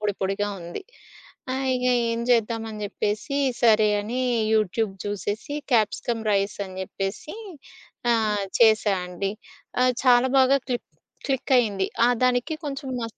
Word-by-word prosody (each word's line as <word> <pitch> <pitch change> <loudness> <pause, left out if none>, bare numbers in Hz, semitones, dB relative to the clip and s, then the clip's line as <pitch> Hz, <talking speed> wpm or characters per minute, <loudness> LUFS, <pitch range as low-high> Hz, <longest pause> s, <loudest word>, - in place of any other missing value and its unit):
పొడిపొడిగా 205 0 -1
ఉంది. 170 - -7 0.7
ఆహ్, 265 0 -2
ఇగా 250 0 +2 0.2
ఏం 230 0 -1
జేద్దామని 225 -2 0
జేప్పేసి, 210 +6 -2 0.2
సరే 215 -2 +5
అని, 235 +5 -3 0.3
యూట్యూబ్ 215 0 +1
జూసేసి 205 +7 -4 0.2
క్యాప్సికం 225 +1 +1
రైసని 200 -1 -1
జేప్పేసి 195 - -5 0.8
ఆహ్, 215 -3 +1 0.2
చేసా 215 -3 +5
అండి. 180 +2 -3 0.5
ఆహ్ 255 0 +4
చాలా 250 0 +5
బాగా 265 +1 +5
క్లిక్, 245 -2 -3 0.4
క్లికయ్యింది. 245 -7 +1 0.2
ఆహ్ 245 0 +3
దానికి 250 +4 +1
కొంచెం 275 -1 -5
మస్ 230 -1 -6
220 Hz, 120 wpm, -24 LUFS, 205-250 Hz, 0.8 s, సరే